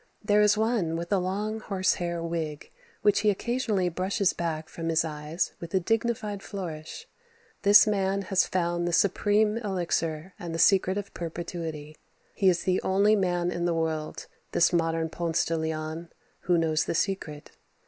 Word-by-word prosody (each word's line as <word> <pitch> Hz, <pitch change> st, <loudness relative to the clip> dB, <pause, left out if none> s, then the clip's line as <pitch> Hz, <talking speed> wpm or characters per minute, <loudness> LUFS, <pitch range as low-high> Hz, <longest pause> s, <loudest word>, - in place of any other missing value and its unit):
There 210 Hz, 0 st, +4 dB
is 210 Hz, 0 st, +4 dB
one 220 Hz, -7 st, +1 dB
with 170 Hz, +3 st, -3 dB
a 195 Hz, -, +3 dB
long, 205 Hz, +4 st, -2 dB
horse 195 Hz, -3 st, 0 dB
hair 170 Hz, -1 st, -2 dB
wig 160 Hz, -3 st, -4 dB, 0.3 s
which 205 Hz, -1 st, +4 dB
he 210 Hz, -, +3 dB
occasionally 215 Hz, -2 st, 0 dB
brushes 185 Hz, +2 st, 0 dB
back 160 Hz, -2 st, -3 dB
from 165 Hz, -1 st, -5 dB
his 165 Hz, 0 st, +2 dB
eyes 150 Hz, +2 st, -3 dB
with 170 Hz, +2 st, -6 dB
a -, -, +4 dB
dignified 220 Hz, 0 st, -1 dB
flourish. 165 Hz, -7 st, -7 dB, 0.5 s
This 205 Hz, +1 st, +8 dB
man 200 Hz, -2 st, 0 dB
has 190 Hz, -1 st, +2 dB
found 175 Hz, -1 st, -1 dB
the 175 Hz, -, -1 dB
supreme 205 Hz, +4 st, +2 dB
elixir 175 Hz, -5 st, -2 dB
and 170 Hz, -2 st, -5 dB
the -, -, -2 dB
secret 190 Hz, +1 st, +4 dB
of 200 Hz, -1 st, -5 dB
perpetuity. 165 Hz, -3 st, -6 dB, 0.4 s
He 195 Hz, -, +3 dB
is 175 Hz, -2 st, +1 dB
the 185 Hz, 0 st, +1 dB
only 200 Hz, +3 st, +3 dB
man 175 Hz, -3 st, 0 dB
in 175 Hz, 0 st, -2 dB
the 170 Hz, -1 st, +1 dB
world, 160 Hz, -1 st, -2 dB, 0.3 s
this 170 Hz, +1 st, +3 dB
modern 165 Hz, -1 st, +1 dB
Ponce 165 Hz, 0 st, -1 dB
de 165 Hz, -, -1 dB
Leon, 160 Hz, +1 st, -4 dB, 0.3 s
who 175 Hz, -1 st, +1 dB
knows 160 Hz, -1 st, +1 dB
the -, -, -2 dB
secret. 160 Hz, -6 st, -2 dB
175 Hz, 170 wpm, -27 LUFS, 165-200 Hz, 0.5 s, This